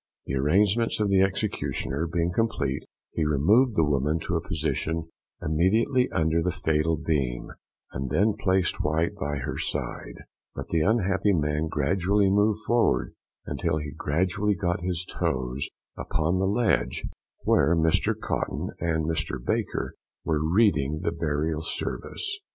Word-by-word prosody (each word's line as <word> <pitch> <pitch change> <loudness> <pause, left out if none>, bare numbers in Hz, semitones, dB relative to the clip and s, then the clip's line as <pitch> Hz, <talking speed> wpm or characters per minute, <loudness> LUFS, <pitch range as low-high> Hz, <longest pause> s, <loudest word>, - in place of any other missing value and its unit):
The - - -4
arrangements 100 - +2
of 105 -1 +1
the 95 -1 +4
executioner 95 - -1
being 85 +1 0
complete, 100 -11 -1 0.3
he 80 - -1
removed 100 - +3
the 80 - +4
woman 75 +2 +1
to 90 - -2
a 80 - +1
position 80 0 -2 0.3
immediately 110 - +2
under 80 +1 +1
the 90 +2 0
fatal 80 0 +1
beam, 70 -6 -1 0.4
and 65 0 -4
then 105 - +3
placed 95 -2 0
White 80 +2 +1
by 75 +1 -3
her 65 - -4
side; - - -4 0.3
but - - -6
the 80 - +1
unhappy 100 0 +2
man 75 -1 0
gradually 95 +6 +2
moved 105 +1 +2
forward, 120 0 +2 0.3
until 80 -2 -1
he 75 -2 -4
gradually 95 +7 0
got 85 -2 -1
his 90 -1 -2
toes 65 -2 -2 0.3
upon 80 +4 0
the 95 - +2
ledge, 110 +2 +1 0.4
where 85 - +4
Mr 80 -1 +2
Cotton - - -2
and 80 -2 0
Mr. 80 -1 -1
Baker - - -2 0.3
were 75 -2 +1
reading 80 -5 +2
the 85 - +1
Burial 80 -1 -1
Service. 390 - -4
80 Hz, 140 wpm, -26 LUFS, 75-95 Hz, 0.4 s, the